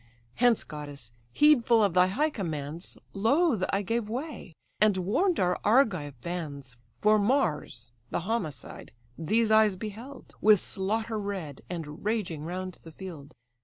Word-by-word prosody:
Hence, 245 -2 +4
goddess! 145 -6 -9 0.2
heedful 240 - +5
of 200 -4 +2
thy 180 0 +5
high 295 +11 +1
commands, 160 - -5 0.2
Loth 230 - +2
I 200 +1 0
gave 225 +2 -1
way, 250 - -6 0.2
and 210 -2 +4
warn'd 280 - +1
our 180 -1 +1
Argive 185 - +2
bands: 145 -8 -6 0.2
For 215 - +3
Mars, 165 - 0 0.2
the - - -2
homicide, 190 -6 -4 0.2
these 220 +7 +1
eyes 215 -2 +5
beheld, 220 +8 -9
With 215 -2 +6
slaughter 220 +4 -1
red, 190 -9 -5
and 160 -4 -6
raging 200 -8 -2
round 185 +2 -5
the 165 - -12
field." 160 -5 -10
195 Hz, 135 wpm, -28 LUFS, 160-225 Hz, 0.2 s, With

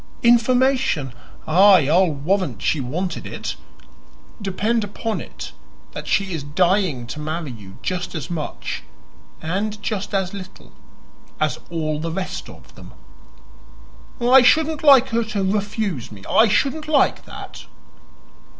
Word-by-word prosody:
"Information? 240 - +3 0.3
Aye, 185 -2 +6
I'll 175 +4 +4
warrant 175 +6 -1
she 155 - 0
wanted 170 +9 -3
it. - - -5 0.9
Depend 210 +4 0
upon 210 +2 -3
it - - -9 0.4
that - - -7
she 195 -2 +1
is 160 - -3
dying 170 -2 +1
to 135 +6 -7
marry 155 -1 -4
you 100 -5 -12
just 180 -1 -3
as 155 -5 -4
much 160 -4 -4 0.6
and 205 +6 -2
just 205 -1 -3
as 190 -1 -1
little 185 -2 -10 0.7
as - - 0
all 155 -3 -2
the 165 +1 -3
rest 185 +3 -4
of - - -15
them." - - -14 1.2
"I 250 +2 +7
shouldn't 310 +4 +3
like 270 -3 +7
her 230 0 +1
to 215 -3 -2
refuse 200 - -2
me 100 -2 -11
I 225 - +5
shouldn't 280 +9 0
like 305 -2 +2
that." - - -10
190 Hz, 130 wpm, -21 LUFS, 160-225 Hz, 1.2 s, I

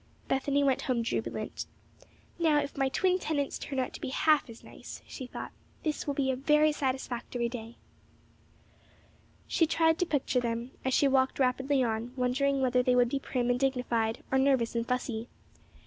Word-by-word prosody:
Bethany 280 +1 +1
went 270 -2 +2
home 245 -3 0
jubilant. 230 - -3 0.7
"Now 315 -3 +4
if 280 - -4
my 270 -1 +1
twin 365 +6 +2
tenants 290 -5 -2
turn 275 - -5
out 255 - -1
to - - -9
be - - -3
half 300 0 +3
as 230 - -12
nice," - - -10
she 260 - -7
thought, - - -7 0.3
"this 305 -2 -2
will 285 - -1
be 270 -2 +1
a - - -1
very 300 +3 +4
satisfactory 255 -4 -2
day." 230 -1 -7 1.7
She 330 - +2
tried 320 +1 +3
to 360 - +1
picture 270 -4 +1
them, 235 +1 -3
as 260 0 +1
she 285 - +4
walked 265 -1 +2
rapidly 265 +1 +2
on, 230 +1 -2
wondering 270 +2 +1
whether 250 -1 +3
they 250 0 +2
would 245 -1 +4
be 275 - -1
prim 245 -2 -1
and 245 - 0
dignified, 250 -4 0
or 265 - +3
nervous 265 -4 +2
and 230 0 -1
fussy. 245 -2 -2 0.3
Mrs. - - -31
260 Hz, 180 wpm, -30 LUFS, 245-280 Hz, 1.7 s, Now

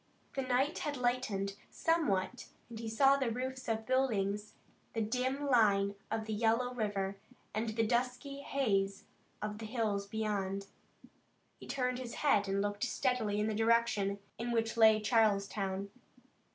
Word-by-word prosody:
The 270 - -1
night 260 +3 +1
had 290 -2 -2
lightened 230 -6 0
somewhat 245 - 0 0.2
and 225 - -7
he 225 -1 -4
saw 270 +5 +5
the 265 -3 0
roofs 255 +2 -4
of 220 -1 -1
buildings, 210 -6 0 0.4
the 225 - -1
dim 255 +5 -1
line 200 -6 +4 0.2
of 220 0 -2
the 220 - -3
yellow 230 +3 +1
river, 200 -4 -2 0.4
and 220 +2 -1
the 225 +1 +1
dusky 250 +4 -1
haze 200 -9 0 0.4
of 210 +1 -4
hills 215 -3 -1
beyond. 200 -2 -2 0.9
He - - -11
turned 250 -2 -1
his 245 -2 -6
head 205 -8 +4
and 195 +1 +1
looked 205 +1 -2
steadily 250 -5 0
in 210 - +1
the 220 - 0
direction 225 -3 +2 0.2
in 240 +1 -2
which 230 -1 0
lay 220 -1 +7
Charleston. 200 -3 +1
225 Hz, 145 wpm, -33 LUFS, 205-250 Hz, 0.9 s, lay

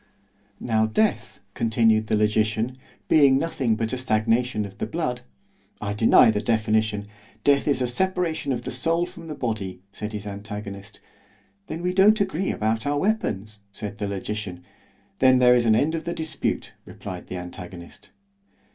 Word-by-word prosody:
——Now 110 -2 +1
death, 210 - 0
continued 110 -1 +2
the - - +1
logician, 110 +3 +1 0.3
being 140 -4 +5
nothing 135 -7 0
but 110 0 -2
the 130 - -2
stagnation 115 -1 +1
of 100 -1 -11
the - - -2
blood—— 150 -7 -2 0.6
I 100 -1 -3
deny 110 +1 +6
the 105 -1 -1
definition——Death 110 +3 0
is 140 -3 +2
the - - +2
separation 170 +1 -1
of 120 -2 -2
the - - -4
soul 165 +7 +1
from 170 -1 -11
the 155 - -5
body, 100 -8 -4
said 105 +2 -6
his 105 -1 -5
antagonist——Then 100 - -9
we 180 0 0
don't 205 +3 +5
agree 190 -2 0
about 110 +3 -1
our 145 0 +1
weapons, 110 - -1
said 105 0 -7
the 100 - -2
logician—Then 100 +4 -2
there 125 -1 +6
is 120 -1 +3
an 110 - +5
end 150 +8 +2
of 165 0 -3
the 170 - -2
dispute, 160 0 -3
replied - - -8
the 95 - -5
antagonist. 90 0 -9
110 Hz, 155 wpm, -24 LUFS, 105-140 Hz, 0.6 s, deny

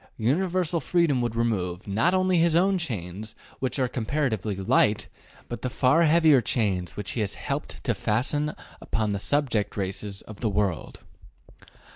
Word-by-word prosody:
Universal 170 +7 +1
freedom 155 -4 +2
would 120 -2 -2
remove, 100 -6 -1
not 110 - +2
only 185 -1 +3
his 165 -1 +3
own 190 +2 +3
chains, 105 - -5 0.2
which 130 +1 -2
are 130 -2 +1
comparatively 115 -4 -1
light, 105 +1 +2 0.4
but 120 - -6
the 125 - -2
far 140 +6 +3
heavier 155 -4 +5
chains 100 -6 -1
which 105 - -4
he - - -4
has 100 - -2
helped - - -5
to - - +1
fasten 145 +7 0 0.3
upon 110 -2 -1
the 100 - -1
subject 115 -6 0
races 100 +1 -3
of 110 -2 -11
the 110 - 0
world. 100 -5 -2
120 Hz, 155 wpm, -26 LUFS, 105-150 Hz, 0.4 s, heavier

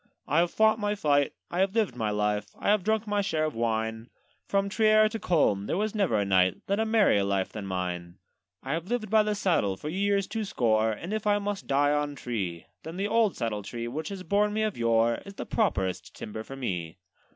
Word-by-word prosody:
'I 155 - +3
have 175 0 +2
fought 220 0 +3
my 205 0 0
fight, 145 -7 +2 0.2
I 175 - -2
have 190 +2 +1
lived 215 - +1
my 110 -3 -1
life, 105 0 -1
I - - -1
have 210 -2 +3
drunk 220 +1 +1
my 205 -1 0
share 155 -5 0
of 155 - -2
wine; 110 0 -2 0.4
From 200 0 +1
Trier 215 +1 +4
to 220 +1 -4
Coln 105 - +1
there - - -1
was 215 +1 -1
never 195 - +1
a 100 - +1
knight 95 -1 +3
Led 200 +2 0
a 220 - +1
merrier 215 - +4
life 100 -1 -1
than 105 -2 -6
mine. 90 -1 -4 0.5
'I 135 - -2
have 165 +2 -3
lived 220 -2 -2
by 220 -1 +6
the 210 0 0
saddle 165 - +1
for 150 - -6
years 200 +3 +1
two 220 +2 -3
score; 110 - +1
And 165 - -5
if 215 -1 -2
I 205 0 +4
must 205 -1 -4
die 145 +1 +3
on 145 -1 -1
tree, 100 -10 -4 0.2
Then 165 +2 -8
the 200 +2 0
old 220 -2 +2
saddle 110 -3 -2
tree, 115 +4 -5
which 150 +6 -4
has 195 -2 -6
borne 205 +2 +1
me 215 +1 0
of 215 -2 -1
yore, 115 0 +2
Is 200 0 -11
the - - -5
properest 95 - -1
timber 110 +1 -6
for 135 - -9
me. 90 -11 -4
155 Hz, 230 wpm, -28 LUFS, -, 0.5 s, by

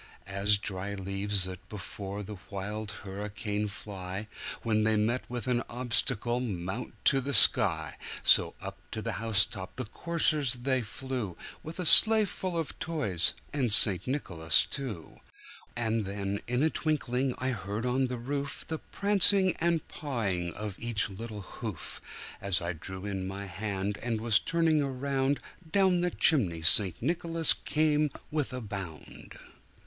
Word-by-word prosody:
As 100 +1 +4
dry 100 0 -4
leaves 100 0 0
that 90 0 -6
before 100 0 -7
the 105 +1 -8
wild 105 +2 -5
hurricane 105 +1 -4
fly, 100 -1 -7 0.4
When 110 -2 +1
they 110 0 +2
meet 115 +4 -1
with 120 -1 -5
an 125 -2 0
obstacle, 120 0 0
mount 100 -1 -5
to 135 - +3
the 140 +2 -1
sky, 85 - +7 0.3
So - - +5
up - - -8
to - - -5
the - - -3
house 110 -3 +5
top 95 0 -8
the 130 - -4
coursers 155 0 0
they 130 +1 -1
flew, 115 -4 -5 0.2
With 160 +2 -9
the 180 - -4
sleigh 220 +5 +10
full 185 -2 -4
of 165 -3 -4
toys, 105 - 0 0.2
and 130 -6 -1
St. 100 -3 +5
Nicholas 85 - +1
too. 125 - -7 0.6
And 110 -2 -1
then, 100 0 -4
in 125 +3 0
a 160 - +2
twinkling, 135 -4 -1
I 130 - -2
heard 105 -1 -4
on 130 +1 0
the 125 0 -5
roof 140 +4 -5
The 160 -1 -4
prancing 200 -2 +2
and 170 -1 -1
pawing 100 - -3
of 105 -2 -6
each 115 -3 -1
little 105 +1 -7
hoof. 105 0 -7 0.4
As 95 -3 0
I 85 +1 -3
drew 95 +4 -8
in 95 -2 -4
my 100 +1 -6
hand, 100 +1 -4
and 115 -2 -2
was 110 -2 +2
turning 165 -2 +1
around, 135 0 -1 0.3
Down 190 -1 +3
the 180 - +1
chimney 95 - +1
St. 90 +1 +4
Nicholas 165 +2 +2
came 150 -1 0 0.2
with 150 -3 -2
a 130 0 -5
bound. 95 -8 -9
110 Hz, 155 wpm, -29 LUFS, 100-140 Hz, 0.6 s, sleigh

